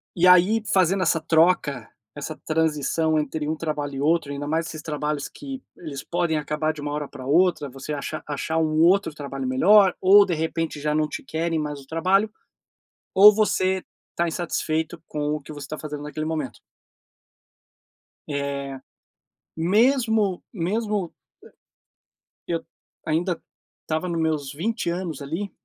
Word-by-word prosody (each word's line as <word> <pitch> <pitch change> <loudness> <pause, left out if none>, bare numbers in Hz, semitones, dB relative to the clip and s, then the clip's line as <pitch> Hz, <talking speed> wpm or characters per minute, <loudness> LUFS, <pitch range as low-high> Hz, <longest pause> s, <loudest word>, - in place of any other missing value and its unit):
e 180 +1 +4
aí, 180 +5 +6
fazendo 190 0 +3
essa 165 -2 +2
troca, 160 -7 +2 0.3
essa 150 +2 -5
transição 160 0 +1
entre 150 0 -2
um 155 - 0
trabalho 150 -3 -3
e 135 - -3
outro, 155 -1 +1
ainda 145 +1 -5
mais 160 +2 0
esses 155 -1 -7
trabalhos 150 -2 -3
que 270 -2 -8 0.2
eles 150 -5 -7
podem 170 -2 0
acabar 150 +1 -1
de 155 - -9
uma 145 0 -3
hora 145 0 -3
pra 130 - -10
outra, 165 0 +3
você 135 +3 -6
acha 150 +2 -4
achar 150 +2 -2
um 155 -1 +2
outro 185 0 +4
trabalho 140 -2 -5
melhor 190 +9 +5
ou, 200 +2 +7
de 180 - -1
repente, 160 -1 -2
já 150 0 0
não 155 0 +1
te - - -6
querem 165 0 -1
mais 150 -1 -4
no 135 - -14
trabalho, 185 +7 +2 0.8
ou 205 +2 +9
você 190 -3 +1 0.3
está 170 - 0
insatisfeito 160 -1 -2
com 150 0 -2
o 150 - -5
que 140 - -11
você 145 -2 -7
está 155 +2 -6
fazendo 150 -1 -6
naquele 150 +1 -4
momento. 155 -6 -3 1.7
Eh, 140 -1 -3 0.8
mesmo 215 +2 +2
mesmo 205 0 -1 1.3
e - - -3
eu 165 - -2 0.4
ainda 170 +3 0 0.4
estava 160 +3 -2
nos 170 -1 -1
meus 155 -4 -1
20 195 +4 -2
anos 170 -4 -4
ali, 165 +8 -4
160 Hz, 155 wpm, -24 LUFS, 150-180 Hz, 1.7 s, ou